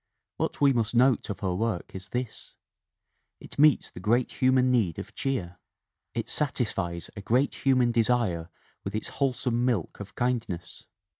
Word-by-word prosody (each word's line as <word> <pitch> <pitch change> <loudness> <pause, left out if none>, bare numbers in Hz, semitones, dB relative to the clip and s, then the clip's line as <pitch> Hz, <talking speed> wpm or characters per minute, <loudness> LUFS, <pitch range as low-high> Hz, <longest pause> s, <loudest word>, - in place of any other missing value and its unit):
What - - -2
we 140 -1 +5
must 115 -1 0
note 125 0 +4
of 95 -2 -5
her 95 -3 0
work 105 -1 -2
is 95 +1 -8
this: 125 -3 -5 0.8
It - - -11
meets 150 -1 +5
the - - -9
great 115 +6 +1
human 130 0 +4
need 105 -10 +2
of - - -7
cheer, 90 -11 -3 0.6
it - - -2
satisfies 95 - -1
a 100 - -6
great 125 +7 +2
human 130 -3 +4
desire 115 -8 +1 0.3
with 100 +2 -4
its 110 - -2
wholesome 125 -3 0
milk 120 -9 -1
of 100 0 -9
kind 125 -2 +1
ness. 85 -1 -7
115 Hz, 160 wpm, -27 LUFS, 95-125 Hz, 0.8 s, we